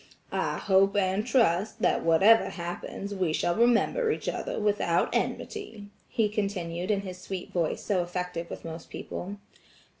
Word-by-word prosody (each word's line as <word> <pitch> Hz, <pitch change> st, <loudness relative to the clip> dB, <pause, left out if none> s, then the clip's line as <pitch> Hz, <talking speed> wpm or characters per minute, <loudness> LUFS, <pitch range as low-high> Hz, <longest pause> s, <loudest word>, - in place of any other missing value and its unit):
"I -, -, -1 dB
hope 195 Hz, 0 st, +3 dB
and 195 Hz, +1 st, +2 dB
trust 215 Hz, -5 st, +2 dB
that -, -, +3 dB
whatever 195 Hz, +8 st, +5 dB
happens 175 Hz, +3 st, -5 dB
we 185 Hz, -5 st, 0 dB
shall 175 Hz, -, +1 dB
remember 245 Hz, -, +3 dB
each -, -, -2 dB
other -, -, -2 dB
without 205 Hz, -5 st, +1 dB
enmity," 225 Hz, -, -3 dB, 0.2 s
he 225 Hz, -2 st, +2 dB
continued 190 Hz, -4 st, -2 dB
in 205 Hz, -2 st, +2 dB
his 185 Hz, -2 st, -7 dB
sweet 185 Hz, -2 st, -6 dB
voice 170 Hz, -3 st, 0 dB
so 195 Hz, -4 st, +1 dB
effective 175 Hz, -1 st, -4 dB
with -, -, -8 dB
most 165 Hz, 0 st, -7 dB
people. 195 Hz, +3 st, -6 dB
195 Hz, 150 wpm, -28 LUFS, 175-210 Hz, 0.2 s, whatever